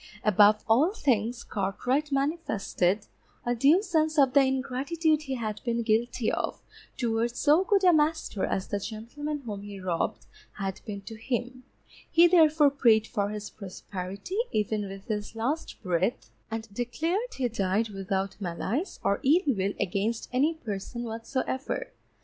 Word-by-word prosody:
Above 210 Hz, +1 st, +5 dB
all 260 Hz, +11 st, +4 dB
things 235 Hz, -, 0 dB
Cartwright 250 Hz, +9 st, -1 dB
manifested 220 Hz, -, 0 dB, 0.4 s
a 240 Hz, -, +1 dB
due 285 Hz, -, +4 dB
sense 315 Hz, -5 st, +1 dB
of 270 Hz, -3 st, +5 dB
the 280 Hz, -, +7 dB
ingratitude 275 Hz, +4 st, +1 dB
he 270 Hz, -3 st, -4 dB
had 215 Hz, -3 st, -4 dB
been 235 Hz, -1 st, 0 dB
guilty 230 Hz, +1 st, +1 dB
of -, -, -2 dB, 0.4 s
towards 235 Hz, 0 st, 0 dB
so 305 Hz, +5 st, +4 dB
good 395 Hz, 0 st, +2 dB
a 360 Hz, -2 st, +7 dB
master 310 Hz, -9 st, +1 dB
as 190 Hz, -, -1 dB
the 205 Hz, -, -2 dB
gentleman 260 Hz, +8 st, -5 dB
whom 205 Hz, -3 st, -5 dB
he 200 Hz, -1 st, -8 dB
robbed 180 Hz, -3 st, -2 dB, 0.3 s
had 195 Hz, -1 st, -4 dB
been 200 Hz, -2 st, -5 dB
to 210 Hz, -, -9 dB
him, 245 Hz, +2 st, -4 dB, 0.4 s
he 335 Hz, +1 st, +6 dB
therefore 315 Hz, -4 st, +5 dB
prayed 230 Hz, -6 st, +4 dB
for 205 Hz, -3 st, -1 dB
his 210 Hz, 0 st, -6 dB
prosperity, 195 Hz, -, -6 dB
even 210 Hz, -1 st, 0 dB
with 195 Hz, 0 st, -9 dB
his 210 Hz, 0 st, -4 dB
last 265 Hz, +9 st, -2 dB
breath, 180 Hz, +4 st, -1 dB, 0.2 s
and 220 Hz, -2 st, -5 dB
declared 320 Hz, -, -2 dB
he 260 Hz, -2 st, 0 dB
died 210 Hz, 0 st, 0 dB
without 195 Hz, 0 st, -3 dB
malice 200 Hz, -, -3 dB
or 200 Hz, -, +1 dB
ill 295 Hz, +1 st, +4 dB
will 195 Hz, -1 st, -1 dB
against 210 Hz, +5 st, -1 dB
any 295 Hz, +6 st, +2 dB
person 230 Hz, -2 st, -5 dB
whatsoever. 240 Hz, +3 st, -3 dB
235 Hz, 150 wpm, -28 LUFS, 205-285 Hz, 0.4 s, the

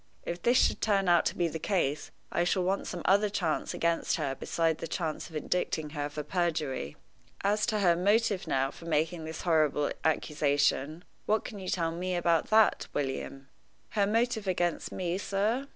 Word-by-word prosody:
If 175 Hz, 0 st, -4 dB
this 240 Hz, +6 st, +4 dB
should -, -, +3 dB
turn 200 Hz, -3 st, +2 dB
out 175 Hz, -2 st, +4 dB
to -, -, -3 dB
be 175 Hz, -, +2 dB
the 160 Hz, 0 st, -5 dB
case, 155 Hz, -6 st, -1 dB, 0.2 s
I 175 Hz, -, +1 dB
shall 180 Hz, +1 st, +1 dB
want 190 Hz, +2 st, -1 dB
some 175 Hz, -2 st, -5 dB
other 200 Hz, +2 st, +4 dB
chance 175 Hz, -6 st, -1 dB
against 170 Hz, 0 st, +1 dB
her 145 Hz, -4 st, -2 dB
besides 165 Hz, +3 st, -1 dB
the -, -, -4 dB
chance 160 Hz, 0 st, -3 dB
of 160 Hz, -, -12 dB
indicting 155 Hz, -1 st, -1 dB
her 145 Hz, -1 st, -3 dB
for 150 Hz, +1 st, -5 dB
perjury. 150 Hz, -, -2 dB, 0.4 s
As 205 Hz, +2 st, +1 dB
to 215 Hz, -3 st, 0 dB
her 175 Hz, -3 st, +4 dB
motive 205 Hz, +2 st, +2 dB
now 135 Hz, 0 st, +1 dB
for 165 Hz, -, -13 dB
making 160 Hz, +1 st, 0 dB
this 160 Hz, 0 st, -6 dB
horrible 155 Hz, -4 st, +2 dB
accusation, 150 Hz, 0 st, +1 dB, 0.2 s
what 215 Hz, +1 st, +1 dB
can 205 Hz, -, -7 dB
you 185 Hz, -, -7 dB
tell 165 Hz, -2 st, 0 dB
me 180 Hz, +2 st, -2 dB
about 170 Hz, -2 st, +1 dB
that, 220 Hz, 0 st, +4 dB
William?" 135 Hz, -1 st, -3 dB, 0.4 s
"Her 200 Hz, -2 st, +1 dB
motive 225 Hz, -1 st, 0 dB
against 175 Hz, -2 st, -1 dB
me, 180 Hz, 0 st, -2 dB
sir?" 215 Hz, +8 st, -1 dB
170 Hz, 185 wpm, -29 LUFS, 155-195 Hz, 0.4 s, this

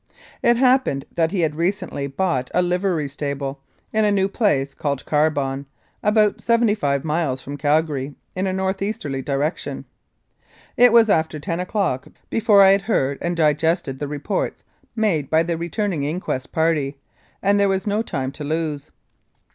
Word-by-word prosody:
It 235 Hz, 0 st, +4 dB
happened 250 Hz, -, +2 dB
that 165 Hz, -1 st, +1 dB
he 190 Hz, -, 0 dB
had 155 Hz, -2 st, +1 dB
recently 165 Hz, -4 st, -2 dB
bought 135 Hz, -4 st, -1 dB
a 180 Hz, -, +4 dB
livery 180 Hz, -3 st, 0 dB
stable 140 Hz, -1 st, -4 dB, 0.3 s
business 220 Hz, -, +1 dB
in 215 Hz, -, +4 dB
a 205 Hz, -, +3 dB
new 195 Hz, -1 st, +2 dB
place 150 Hz, -, 0 dB
called 140 Hz, -3 st, -3 dB
Carbon, 140 Hz, -3 st, 0 dB, 0.3 s
about 210 Hz, -1 st, +2 dB
seventy 230 Hz, -2 st, +3 dB
five 140 Hz, -9 st, 0 dB
miles 150 Hz, -4 st, 0 dB
from 140 Hz, -, -6 dB
Calgary 145 Hz, -2 st, 0 dB, 0.2 s
in 185 Hz, +1 st, -1 dB
a -, -, 0 dB
north 190 Hz, +1 st, -2 dB
easterly 150 Hz, -10 st, -3 dB
direction. 145 Hz, +4 st, -2 dB, 0.9 s
It 245 Hz, -1 st, +6 dB
was 230 Hz, -1 st, +6 dB
after 160 Hz, -2 st, +1 dB
10 165 Hz, +2 st, -3 dB
o'clock 180 Hz, -, -1 dB, 0.2 s
before 210 Hz, -3 st, +5 dB
I 195 Hz, -, +7 dB
had 195 Hz, 0 st, +3 dB
heard 140 Hz, -, 0 dB
and 175 Hz, 0 st, -2 dB
digested 155 Hz, -2 st, +1 dB
the 145 Hz, -, -3 dB
reports 150 Hz, -, -3 dB, 0.3 s
made 190 Hz, -, 0 dB
by 160 Hz, +1 st, +3 dB
the 170 Hz, 0 st, -1 dB
returning 175 Hz, 0 st, -2 dB
inquest 145 Hz, -3 st, -3 dB
party, 155 Hz, -4 st, 0 dB, 0.5 s
and 200 Hz, +1 st, +3 dB
there 200 Hz, -1 st, +3 dB
was 190 Hz, +1 st, 0 dB
no 210 Hz, +1 st, +1 dB
time 135 Hz, -11 st, -3 dB
to 150 Hz, -, -8 dB
lose. 155 Hz, -1 st, -3 dB
165 Hz, 165 wpm, -22 LUFS, 140-195 Hz, 0.9 s, I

